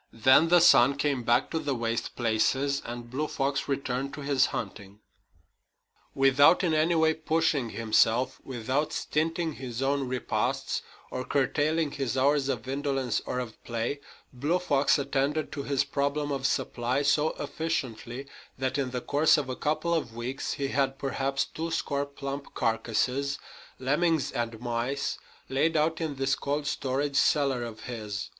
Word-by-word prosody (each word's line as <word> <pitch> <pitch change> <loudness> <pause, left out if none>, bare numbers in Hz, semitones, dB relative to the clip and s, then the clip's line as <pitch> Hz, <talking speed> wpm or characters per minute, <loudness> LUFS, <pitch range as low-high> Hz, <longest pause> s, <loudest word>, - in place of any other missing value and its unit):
Then 130 +8 +5
the 175 +1 +6
sun 140 -5 +6
came 140 -3 0
back 120 +2 +2
to 160 - 0
the 145 -3 -1
waste 115 -1 -2
places, 130 +5 +1
and 120 0 -7
Blue 150 +4 -1
Fox 135 -1 -1
returned 135 -1 -2
to 150 - -7
his 140 -2 +3
hunting. 100 -2 -6 1.2
Without 140 +6 +5
in 170 -3 +2
any 155 +2 +3
way 160 0 +4
pushing 155 -5 0
himself, 115 +3 +2
without 130 +4 -2
stinting 160 +1 -1
his 125 -1 -4
own 140 0 0
repasts 125 0 -1 0.3
or 130 - -3
curtailing 145 +3 +1
his 135 -3 -2
hours 140 +1 +2
of 125 -3 -3
indolence 135 -3 -1
or - - -2
of 125 -3 -6
play, 115 +4 -2 0.3
Blue 145 +8 0
Fox 145 -6 +2
attended 140 +2 -1
to 140 - -4
his 140 -1 +1
problem 140 +1 -1
of 135 -1 0
supply 125 +4 -1
so 150 +2 +2
efficiently 130 -5 -3 0.3
that 130 +1 -1
in 135 -2 -1
the 125 -1 -3
course 150 +5 +4
of 140 -3 -2
a 130 - -2
couple 155 +4 0
of 125 -9 -2
weeks 125 +3 -3
he 140 -1 -2
had 135 0 0
perhaps 135 0 -1
two 165 +1 -5
score 145 -3 -1
plump 140 0 -6
carcasses, 125 +4 0 0.4
lemmings 150 +3 +1
and 115 -1 -3
mice, 120 +4 -2 0.3
laid 155 +5 +1
out 160 +2 +1
in 155 -3 -2
this 135 0 0
cold 145 +2 -2
storage 140 0 -1
cellar 140 -5 +3
of 115 -2 -7
his. 105 -4 -5
135 Hz, 155 wpm, -28 LUFS, 125-145 Hz, 1.2 s, the